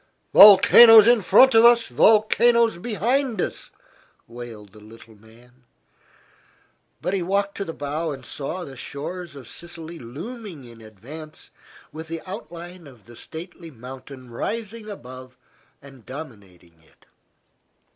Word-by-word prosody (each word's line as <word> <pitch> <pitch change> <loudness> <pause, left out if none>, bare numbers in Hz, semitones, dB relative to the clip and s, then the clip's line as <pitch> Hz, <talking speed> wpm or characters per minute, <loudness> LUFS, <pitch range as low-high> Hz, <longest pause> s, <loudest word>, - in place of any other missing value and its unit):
"Volcanoes 215 +2 +8
in 240 -1 +3
front 215 +8 +5
of 225 0 +5
us, 235 0 +5
volcanoes 220 - +2
behind 240 +3 -2
us!" - - -5 0.6
wailed 115 -4 -11
the 105 - -16
little 110 +1 -17
man. 120 +4 -22 1.4
But 180 - -2
he 195 - -1
walked 200 +3 -2
to 200 - -4
the 165 - -6
bow 150 +3 -4
and 135 -3 -10
saw 150 +9 -6
the 135 - -12
shores 155 +6 -8
of 135 -5 -12
Sicily 170 -1 -10
looming 175 - -10
in 115 -2 -15
advance, 135 +9 -13 0.4
with 160 +2 -10
the 165 0 -7
outline 175 -1 -10
of 120 -7 -18
the 120 +1 -16
stately 170 +5 -11
mountain 130 0 -13
rising 220 - -6
above 130 -8 -12 0.5
and 135 -4 -16
dominating 100 - -13
it. 80 - -28
160 Hz, 130 wpm, -22 LUFS, 125-200 Hz, 1.4 s, Volcanoes